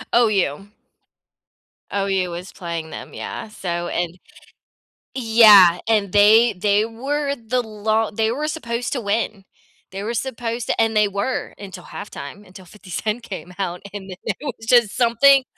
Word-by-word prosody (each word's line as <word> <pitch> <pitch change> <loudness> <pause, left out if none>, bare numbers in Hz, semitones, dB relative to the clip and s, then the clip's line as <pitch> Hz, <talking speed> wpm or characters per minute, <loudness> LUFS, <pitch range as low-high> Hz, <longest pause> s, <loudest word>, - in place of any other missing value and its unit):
OU. 200 -6 +2 1.3
OU 195 -2 0
was 175 +2 -7
playing 170 -3 -5
them, - - -9
yeah, - - -6
so, 175 -4 -4
and 175 0 -3 1.0
Yeah. 215 -7 +7
And 210 -4 +1
they 215 +3 +6
they 205 +2 +2
were 280 +5 -2
the 250 0 -1
lo 220 0 -1
they 220 +1 0
were 295 +5 -2
supposed 240 -6 -3
to 260 - -1
win. 205 -1 -2 0.5
They 195 +1 -6
were 230 - -3
supposed 235 -1 -3
to, - - -1
and 225 -1 +1
they 210 -1 +4
were 200 +6 -3
until 190 -3 -10
halftime, 200 -1 -9
until 185 0 -14
50 190 +1 -16
Cent 215 +7 -3
came 185 -4 -8
out, 180 -2 -3
and 195 -1 -8
then, 180 - -8
it - - -2 0.2
was 225 - -11
just 235 -4 +4
something 255 +3 +5
210 Hz, 155 wpm, -21 LUFS, 190-230 Hz, 1.3 s, Yeah